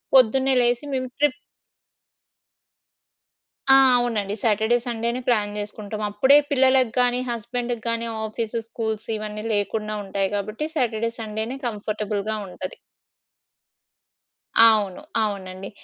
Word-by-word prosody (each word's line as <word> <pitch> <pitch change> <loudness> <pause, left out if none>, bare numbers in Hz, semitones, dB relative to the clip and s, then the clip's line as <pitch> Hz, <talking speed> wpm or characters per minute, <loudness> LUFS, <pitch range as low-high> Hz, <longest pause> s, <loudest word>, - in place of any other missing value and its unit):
పొద్దున్నే 265 +2 +5
లేసి 240 +3 +1
మేము 255 -1 -2
ట్రిప్ 295 -2 +1 2.4
ఆ! - - +9 0.2
అవునండి. 215 -4 -1
సాటర్‌డే, 220 +2 +3
సండేనే 235 +1 -2
ప్లాన్ 210 -4 +1
చేసుకుంటాం 210 0 -5
అప్పుడే 265 +8 +5
పిల్లలకి 260 -3 +3
గానీ 245 0 +3
హస్బెండ్‌కి 240 0 -3
గానీ 230 0 -1 0.2
ఆఫీస్, 225 +1 -4
స్కూల్స్ 220 -2 -4
ఇవన్నీ 215 0 -6
లేకుండా 210 +1 -1
ఉంటాయి 195 0 -1
కాబట్టి 215 +9 -3
సాటర్‌డే, 230 -4 0
సండేనే 220 +3 -4
కంఫర్టబుల్‌గా 215 -1 -3
ఉంటది. 185 +1 -7 1.9
అవును. 210 -4 +2 0.2
అవునండి. 195 -2 -5
220 Hz, 100 wpm, -23 LUFS, 210-245 Hz, 2.4 s, ఆ